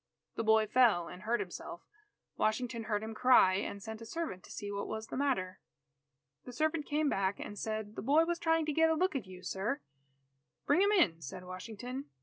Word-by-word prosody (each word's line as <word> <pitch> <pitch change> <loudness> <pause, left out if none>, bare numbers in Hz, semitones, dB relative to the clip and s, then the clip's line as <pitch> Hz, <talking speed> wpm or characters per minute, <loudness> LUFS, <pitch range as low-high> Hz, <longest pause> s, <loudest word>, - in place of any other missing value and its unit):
The - - -2
boy 220 0 +5
fell 215 -7 +4
and 180 - -9
hurt 230 +3 0
himself. 180 -2 -6 0.5
Washington 230 +1 -1
heard 210 -2 -1
him 220 0 -5
cry, 220 -5 +6
and 200 0 -4
sent 220 +1 -7
a - - -7
servant 310 - -4
to - - -15
see 205 -1 -5
what 200 0 -3
was 220 0 -4
the - - -7
matter. 250 -10 -1 0.8
The 250 - -9
servant 310 +3 0
came 300 +1 +1
back 195 -5 0
and 205 - -6
said, 215 0 -4
"The - - -4
boy 295 +8 +4
was 345 0 -1
trying 325 -1 +2
to 305 - -1
get 320 +2 +4
a 320 - +3
look 365 0 +1
at 240 -8 -3
you, 185 -1 -11
sir." 215 +9 -2 0.9
"Bring 295 +6 +4
him 405 +1 +4
in," 180 - +3
said 150 +5 -7
Washington. 225 +8 -6
220 Hz, 205 wpm, -33 LUFS, 200-285 Hz, 0.9 s, cry